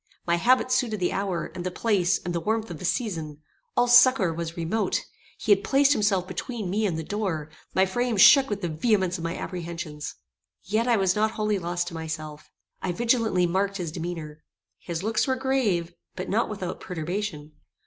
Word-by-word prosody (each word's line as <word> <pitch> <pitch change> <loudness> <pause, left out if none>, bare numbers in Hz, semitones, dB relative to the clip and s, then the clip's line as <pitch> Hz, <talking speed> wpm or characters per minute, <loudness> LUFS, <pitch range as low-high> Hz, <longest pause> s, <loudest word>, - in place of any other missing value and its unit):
My 170 0 +2
habit 255 +6 +3
suited 240 -5 +1
the 180 - 0
hour, 195 -3 -2
and 175 - -6
the 185 - -1
place, 190 -2 +1
and 175 - -2
the 170 - 0
warmth 220 +2 -1
of 160 - -7
the - - -5
season. 160 - -2 0.3
All 245 - +4
succour 245 -7 +6
was 165 0 -5
remote. 175 +6 0 0.3
He - - -1
had 400 0 +5
placed 280 -6 +4
himself 200 -6 +1
between 210 0 -4
me 210 +2 +1
and 170 -4 -2
the 160 - -3
door. 165 -6 -3 0.2
My 190 - +5
frame 240 +4 -1
shook 270 +8 +8
with 205 -1 -3
the - - +1
vehemence 185 +2 +1
of - - -6
my 165 0 -3
apprehensions. 170 -4 -6 0.5
Yet 220 +4 0
I 235 -2 +4
was 190 -2 +2
not 215 +1 +2
wholly 210 -2 0
lost 175 0 -2
to - - -12
myself: 155 -2 -6 0.3
I 185 - -1
vigilantly 230 -3 +2
marked 195 +3 0
his 175 -4 -4
demeanour. 160 -2 -6 0.4
His 170 0 -5
looks 220 +4 +1
were 260 - +2
grave, 240 -11 0 0.2
but 185 - -5
not 225 +4 +1
without 190 -4 -5
perturbation. 170 -2 -4
185 Hz, 190 wpm, -26 LUFS, 170-220 Hz, 0.5 s, shook